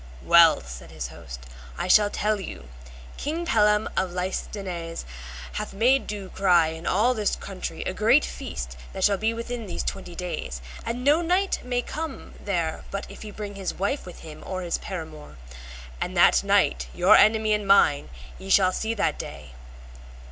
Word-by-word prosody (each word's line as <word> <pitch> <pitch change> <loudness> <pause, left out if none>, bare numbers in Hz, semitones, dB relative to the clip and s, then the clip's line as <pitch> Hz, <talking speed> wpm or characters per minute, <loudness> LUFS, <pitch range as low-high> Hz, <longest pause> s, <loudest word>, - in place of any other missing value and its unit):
Well, - - +6
said 60 0 -10
his 65 - -6
host, - - -10 0.4
I - - -2
shall 205 +2 +6
tell 210 0 0
you, 65 - -8 0.5
King 325 +4 -3
Pellam 210 -5 +3
of 190 - 0
Listeneise 180 -1 -4 0.5
hath 65 - -4
made 255 +6 +3
do 200 -3 -5
cry 175 -5 +3
in 160 +1 -7
all 225 +7 +3
this 215 -4 0
country 190 -2 -6
a 185 - -3
great 230 +9 +4
feast - - -6 0.2
that 190 - -3
shall 200 0 +4
be 220 +1 +1
within 230 -1 -5
these - - -4
twenty 180 -3 -5
days, 65 - -4 0.2
and 245 +2 -4
no 295 +5 +4
knight 365 +3 +1
may 245 -1 -1
come 320 +5 -6
there 170 -5 -2
but 200 +1 -4
if - - -12
he 215 - -7
bring 205 -1 -7
his 195 -2 -4
wife 200 +5 -2
with 180 - -10
him, 155 -1 -10
or 185 -1 -4
his 170 - -2
paramour; 160 - -8 0.6
and - - -3
that - - +5
knight, 60 0 +2
your - - +6
enemy 215 0 +4
and 210 -1 -1
mine, 155 -7 +4 0.3
ye 195 - -9
shall 185 -1 +5
see 220 +4 -2
that 165 -7 0
day. - - -8
195 Hz, 175 wpm, -25 LUFS, 175-220 Hz, 0.6 s, Well